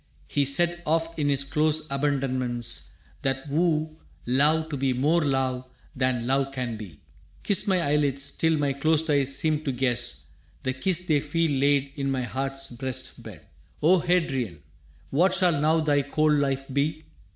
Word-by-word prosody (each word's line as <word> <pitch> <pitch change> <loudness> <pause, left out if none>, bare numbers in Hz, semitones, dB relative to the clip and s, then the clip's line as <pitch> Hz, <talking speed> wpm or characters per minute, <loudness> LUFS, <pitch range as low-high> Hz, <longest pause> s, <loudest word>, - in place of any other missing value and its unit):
He 145 -1 0
said 175 +5 +2
Oft 165 +1 0
in 145 -1 +1
his 140 -1 +2
close 155 +2 +1
abandonments, 130 -4 -1 0.3
that 135 +1 -2
woo 155 0 0 0.3
Love 150 +6 +2
to 150 - -3
be 135 -1 0
more 150 +7 +2
love 130 -2 -1 0.3
than 130 -2 0
love 135 +1 0
can 125 -4 -4
be, 100 -8 -10 0.4
«Kiss 200 - +2
My 190 -2 +2
eyelids 140 -2 +1
till 160 -1 +1
my 145 -2 0
closed 155 +3 +1
eyes 140 -1 +3
seem 155 -1 +1
to 140 - -1
guess 120 - 0 0.4
The 130 - -1
kiss 180 +6 -1
they 155 -4 +2
feel 160 +2 0
laid 140 0 +1
in 140 -1 -1
my 130 -2 -1
heart's 135 +2 -4
breast 125 +1 -5
bed.» - - -12 0.4
O 180 +4 +5
Hadrian, 135 - -1 0.5
what 180 +6 +3
shall 175 -6 +2
now 160 +2 +3
thy 145 -2 +2
cold 155 +2 +1
life 135 -2 0
be? 150 +3 -1
140 Hz, 165 wpm, -25 LUFS, 130-155 Hz, 0.5 s, O